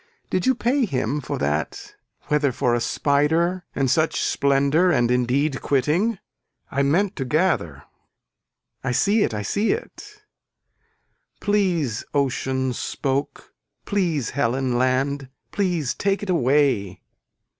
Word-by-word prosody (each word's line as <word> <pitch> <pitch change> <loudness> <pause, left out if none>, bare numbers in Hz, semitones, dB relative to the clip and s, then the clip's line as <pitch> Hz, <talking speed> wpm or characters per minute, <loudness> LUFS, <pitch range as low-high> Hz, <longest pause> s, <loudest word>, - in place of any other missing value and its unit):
Did 185 - 0
you 260 - +4
pay 250 +3 +1
him 140 - -2
for 120 - -4
that 75 +1 -3 0.3
whether 150 -2 +1
for 125 0 0
a 120 - +2
spider 160 +8 +1
and 135 -1 +1
such 155 +6 +1
splendor 140 +5 +2
and 120 -6 +2
indeed 130 +3 +1
quitting. 160 - +1 0.5
I 140 - 0
meant 180 +8 +1
to 135 - -1
gather. 125 - 0 1.0
I 125 -1 -1
see 205 - +2
it - - +1
I 105 -1 -3
see 205 - +1
it. 420 -2 -9 1.2
Please 180 - 0
ocean 130 -1 0
spoke 140 +3 -3 0.3
please 170 - 0
Helen 130 -1 0
land 130 +2 0 0.2
please 175 -9 0
take 200 +1 -1
it 195 - -1
away. 135 - +1
140 Hz, 125 wpm, -23 LUFS, 130-180 Hz, 1.2 s, you